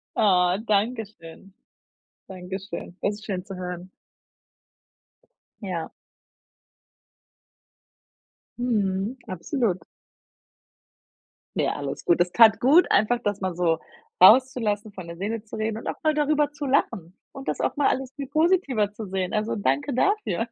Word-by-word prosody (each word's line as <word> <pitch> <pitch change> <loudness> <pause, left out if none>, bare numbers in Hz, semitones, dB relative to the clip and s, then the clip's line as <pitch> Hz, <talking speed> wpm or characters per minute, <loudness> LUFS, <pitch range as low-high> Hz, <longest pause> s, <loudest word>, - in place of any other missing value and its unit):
Oh, 180 -3 +3
danke 220 +3 +1
schön. 185 -1 -15 0.8
Dankeschön. 185 -1 -7
Das 205 - 0
ist 210 +1 -12
schön 185 -3 -3
zu 195 -1 -8
hören. 180 0 -6 1.7
Ja. 180 -5 -4 2.7
Mhm, 215 -1 -1
absolut. 185 - -1 1.8
Ja, - - +1
alles 140 -1 -5
gut. 175 0 +3
Es 175 0 +1
tat 220 -2 +6
gut, 295 +8 +5
einfach 235 +4 +3
das 205 -1 -2
mal 185 -2 -2
so 165 -2 +1 0.4
rauszulassen, 215 -1 +5
von 185 -4 -9
der 170 0 -8
Seele 210 +3 -3
zu 215 - -9
reden 220 0 -2
und - - -9
auch - - -2
mal 310 -1 +3
darüber 295 0 +1
zu 295 0 -6
lachen 195 -9 -1
und 270 0 -10
das - - -2
auch - - -1
mal 290 - +3
alles 265 0 -1
viel 280 -2 -6
positiver 310 - +1
zu 210 -1 -8
sehen, 185 -1 -3
also, 215 +1 -1
danke 145 - 0
dafür. 250 - 0
205 Hz, 135 wpm, -25 LUFS, 185-250 Hz, 2.7 s, tat